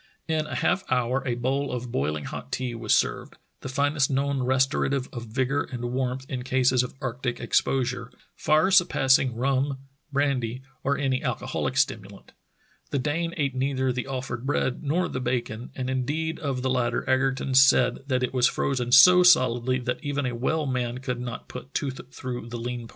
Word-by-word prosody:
In 155 -1 0
a - - -5
half 195 - +1
hour 125 +1 +1
a 120 - 0
bowl 135 +4 -1
of 125 -1 -4
boiling 75 -1 -1
hot - - -7
tea 125 -2 -2
was 115 -2 +1
served, - - -1 0.2
the - - -7
finest 140 +1 +1
known 140 0 0
restorative 130 +1 +1
of 120 -2 -6
vigor 130 +5 0
and 120 -1 -5
warmth 130 0 -2
in 130 -2 -4
cases 130 0 +2
of 125 - -5
arctic 125 -1 -3
ex - - +2
posure 125 -2 -2 0.2
— - - -43
far 155 +5 +4
surpassing 135 -9 +4
rum, 135 +2 0 0.3
brandy, 130 -3 -1 0.2
or 140 +1 +1
any 135 -2 0
alcoholic - - -2
stimulant. - - -2 0.6
The - - -1
Dane 165 +5 -1
ate 140 -3 0
neither 130 0 0
the 125 +1 -4
offered 130 -3 -4
bread 135 -2 -1
nor 165 +5 0
the 130 - -4
bacon, 120 -2 -3
and 130 -1 -3
indeed 145 +5 -2
of 135 -4 -3
the 130 - 0
latter 125 -2 0
Egerton 135 0 +1
said 130 -2 +5
that 130 -2 0
it 125 - -2
was 125 -2 +4
frozen 125 -3 -1
so 180 +8 +9
solidly 130 -7 +4
that 125 +4 -3
even 145 -1 -2
a 125 - -2
well 150 +6 -1
man 125 -2 -2
could 125 -1 -4
not 125 -1 -6
put 130 +2 -10
tooth 130 -2 -4
through 125 -3 -6
the 120 - -5
lean 120 0 -5
parts. - - -22
130 Hz, 185 wpm, -26 LUFS, 125-140 Hz, 0.6 s, so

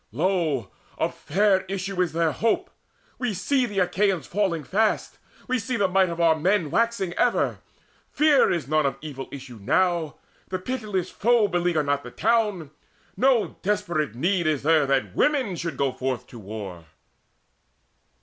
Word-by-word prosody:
Lo, 155 - 0 0.3
of - - -1
fair 190 +3 +2
issue 195 -1 -2
is 180 - +1
there 165 -1 +1
hope: 335 - 0 0.5
we 245 -5 -1
see 255 +7 +1
The 205 -3 -7
Achaeans 190 -1 +1
falling 185 -5 -1
fast: 210 +8 0 0.3
we 255 -1 +1
see 235 +3 -2
the 200 -3 +2
might 190 0 +3
Of 170 0 -5
our 165 -1 +4
men 170 -1 +1
waxing 230 -6 0
ever: - - +1 0.5
fear 300 -2 +4
is 165 -7 -2
none 155 -1 +2
Of 135 -1 -3
evil 135 -4 -7
issue 130 -4 -9
now: 170 - +1 0.3
the 185 - -2
pitiless 200 -4 -3
foe 235 -1 +3
Beleaguer 175 -4 +1
not 145 0 0
the - - -9
town: 210 -9 0 0.4
no 250 -4 +2
desperate 175 - -1
need 170 +5 +1
There 155 - +4
is 140 - -5
that 140 -4 +2
women 265 -10 +1
should 165 0 -4
go 140 -1 +1
forth 130 -1 -3
to 120 - -10
war." 100 -5 -8
180 Hz, 160 wpm, -25 LUFS, 150-210 Hz, 0.5 s, our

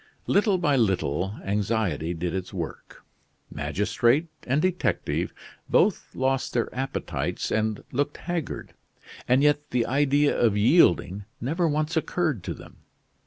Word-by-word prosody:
Little 205 -1 +3
by 150 -6 +2
little 95 - 0
anxiety 100 -4 -1
did 85 +1 -3
its 95 -1 -4
work. - - -7 0.5
Magistrate 120 - +1 0.2
and 130 +4 +2
detective 165 - 0 0.4
both - - +2
lost 130 0 0
their 120 - -1
appetites 135 +1 -3
and 110 -1 0
looked 145 +3 -1
haggard; 175 -3 -4 0.5
and 130 +3 +4
yet 145 0 +2
the 125 -2 +1
idea 145 +2 +2
of 110 -4 +2
yielding 105 - +4
never 165 +8 0
once 155 +2 0
occurred 160 - 0
to - - -3
them. - - -14
130 Hz, 125 wpm, -26 LUFS, 105-150 Hz, 0.5 s, and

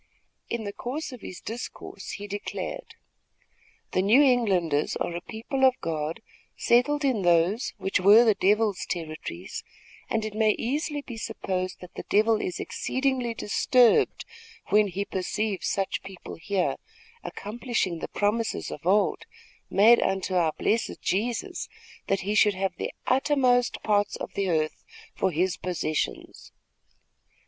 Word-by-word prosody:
In 235 -1 -2
the 200 -1 -5
course 280 +8 -4
of 250 -4 -10
his 180 - -8
discourse, 235 +3 -7
he 205 - -6
declared: 205 - -5 1.0
"The 185 - +2
New 210 +7 +5
Englanders 190 - +2
are 170 - -2
a 175 - -4
people 235 +7 -4
of 260 -1 +5
God 160 +5 -3 0.3
settled 285 +5 +3
in 250 -7 +1
those, 175 +6 +2
which 195 - 0
were 205 +5 +7
the 220 - +5
devil's 205 0 +2
territories, 155 - -5 0.5
and 220 -1 0
it 215 - -5
may 215 0 +3
easily 290 +4 -2
be 240 -4 -8
supposed 185 -4 -3
that 180 - -11
the - - -7
devil 215 +1 +3
is 180 - -3
exceedingly 260 -3 -1
disturbed, 235 +2 +3 0.4
when 210 +1 +5
he 195 +2 -3
perceives 195 +2 -2
such 195 -1 -1
people 190 -2 -9
here, 190 +2 -1 0.5
accomplishing 210 -5 -3
the - - -4
promises 220 +2 -1
of 150 +3 -7
old, 200 +2 +2 0.4
made 225 +4 +6
unto 190 0 -1
our 170 -4 +2
blessed 225 +1 0
Jesus, 240 - -2 0.4
that 195 -1 +1
he 205 +3 -2
should 210 -1 +4
have 190 0 -2
the - - -3
uttermost 255 -2 +2
parts 205 -1 +2
of - - -6
the 195 -1 -1
earth 155 -2 -1 0.3
for 190 - +1
his 180 +2 0
possessions. 165 -4 -3
205 Hz, 140 wpm, -26 LUFS, 185-240 Hz, 1.0 s, were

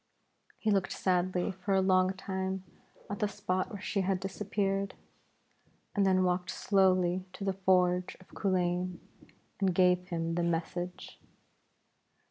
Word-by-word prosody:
He 220 - 0
looked 195 -2 +1
sadly 180 0 +1
for 190 +1 -1
a - - +4
long 185 0 +3
time 190 0 -3 0.4
at 205 - -5
the 210 - +2
spot 195 0 -2
where 205 -2 -7
she 200 - 0
had 190 0 0
disappeared, 195 0 -2 1.0
and 200 -3 +3
then 185 -1 +4
walked 180 0 0
slowly 185 -2 +2
to 195 - -7
the 195 -1 0
forge 180 -1 +2
of 185 - -18
Culain, 180 -2 0 0.6
and 190 -3 +1
gave 180 0 +4
him 165 -2 -2
the 175 - 0
message. 175 +1 -3
185 Hz, 135 wpm, -31 LUFS, 180-195 Hz, 1.0 s, a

